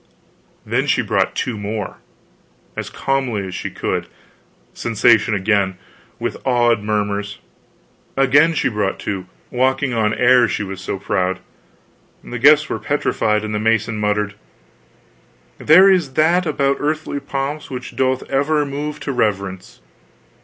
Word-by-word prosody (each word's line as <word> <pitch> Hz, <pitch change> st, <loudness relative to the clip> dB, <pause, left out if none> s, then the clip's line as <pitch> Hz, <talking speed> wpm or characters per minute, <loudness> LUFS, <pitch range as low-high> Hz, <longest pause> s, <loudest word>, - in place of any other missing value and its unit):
Then -, -, 0 dB
she -, -, +2 dB
brought -, -, 0 dB
two 115 Hz, -4 st, -2 dB
more 105 Hz, 0 st, -4 dB, 0.8 s
as -, -, -4 dB
calmly 130 Hz, -7 st, -1 dB
as 95 Hz, -, -7 dB
she -, -, -4 dB
could. -, -, -3 dB, 0.7 s
Sensation 110 Hz, -1 st, +2 dB
again 100 Hz, -2 st, +1 dB, 0.4 s
with -, -, -3 dB
awed 120 Hz, -3 st, +2 dB
murmurs. 105 Hz, -1 st, -2 dB, 0.8 s
Again 145 Hz, +5 st, +4 dB
she -, -, +1 dB
brought 105 Hz, -4 st, -1 dB
two 95 Hz, -3 st, -4 dB, 0.2 s
walking 130 Hz, +1 st, +1 dB
on 110 Hz, -2 st, +1 dB
air, 125 Hz, -1 st, +5 dB
she 105 Hz, -, -2 dB
was 95 Hz, -1 st, -7 dB
so 95 Hz, -, -3 dB
proud. 95 Hz, -1 st, -1 dB, 0.9 s
The 125 Hz, -, -6 dB
guests 150 Hz, +4 st, +6 dB
were -, -, -3 dB
petrified, 110 Hz, -7 st, 0 dB
and 105 Hz, 0 st, -4 dB
the 105 Hz, -, -1 dB
mason 110 Hz, 0 st, +1 dB
muttered: 105 Hz, 0 st, 0 dB, 1.3 s
"There 180 Hz, +6 st, +7 dB
is 175 Hz, -8 st, +3 dB
that 170 Hz, +4 st, +3 dB
about 140 Hz, -2 st, +1 dB
earthly 150 Hz, -1 st, -2 dB
pomps 140 Hz, +2 st, -4 dB
which 125 Hz, -1 st, -7 dB
doth 130 Hz, -1 st, 0 dB
ever 145 Hz, +2 st, +1 dB
move 145 Hz, +2 st, -4 dB
to 140 Hz, -, -3 dB
reverence." 100 Hz, -6 st, -2 dB
120 Hz, 135 wpm, -19 LUFS, 105-140 Hz, 1.3 s, There